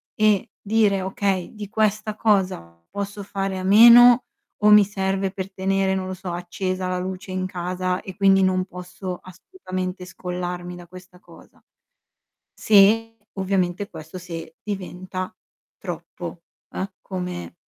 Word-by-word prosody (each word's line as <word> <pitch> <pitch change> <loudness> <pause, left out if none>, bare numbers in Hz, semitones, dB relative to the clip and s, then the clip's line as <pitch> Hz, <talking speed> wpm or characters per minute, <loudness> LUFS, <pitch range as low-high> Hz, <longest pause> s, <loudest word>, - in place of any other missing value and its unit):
e 215 +1 +2
dire: 205 -2 +2
"Okay, 190 -1 -1
di 205 -2 -7
questa 215 -1 0
cosa, 185 - 0
posso 200 0 -5
fare 195 -1 -3
a - - -5
meno 235 +4 +8 0.4
o 210 - +7
mi 210 -1 +9
serve 195 -1 -1
per 195 0 -6
tenere, 190 0 +1
non 185 -1 -3
lo 185 - -4
so, 185 -1 -6
accesa 185 +1 -3
la 185 0 -1
luce 185 +2 -6
in 185 0 -2
casa 180 0 -2
e 190 -2 -9
quindi 195 -1 +4
non 185 0 +2
posso 180 0 -7
assolutamente 185 - -6
scollarmi 180 0 -5
da 175 -1 -12
questa 180 0 -14
cosa?" - - -18 1.0
Se 220 +2 +4 0.2
ovviamente, 190 0 -1
questo 160 +2 -9
se 165 -2 -8
diventa 185 -2 -5 0.5
troppo, 170 -1 -7 0.3
eh, 195 +2 -4
come 180 -2 -5
185 Hz, 135 wpm, -23 LUFS, 180-200 Hz, 1.0 s, mi